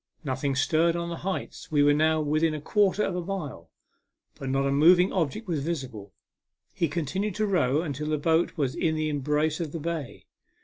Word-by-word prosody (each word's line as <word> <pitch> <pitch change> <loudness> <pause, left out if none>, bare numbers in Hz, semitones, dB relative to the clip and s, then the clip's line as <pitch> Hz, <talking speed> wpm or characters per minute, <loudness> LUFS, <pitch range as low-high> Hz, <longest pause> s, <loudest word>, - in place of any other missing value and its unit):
Nothing 135 0 -1
stirred 160 +5 +2
on 170 0 -3
the 170 - -4
heights; 190 -1 -5
we 145 -2 +4
were 145 0 +5
now 155 +1 +2
within 155 +1 +1
a - - -4
quarter 205 +5 +2
of 180 - -1
a 180 - -2
mile, 155 - -6 0.6
but 135 - -6
not 135 +1 +1
a 140 - +1
moving 175 +6 +5
object 185 - -1
was 160 -6 -1
visible. 130 -11 -5 0.6
He 170 - 0
continued 175 +7 -2
to 215 - 0
row 155 -7 +1
until 150 -2 -4
the 155 0 0
boat 165 +4 +1
was 140 -4 0
in 160 -1 0
the 155 0 -1
embrace 150 +2 0
of 160 -4 -4
the 165 - -3
bay. 160 -4 -5
155 Hz, 195 wpm, -27 LUFS, 145-170 Hz, 0.6 s, were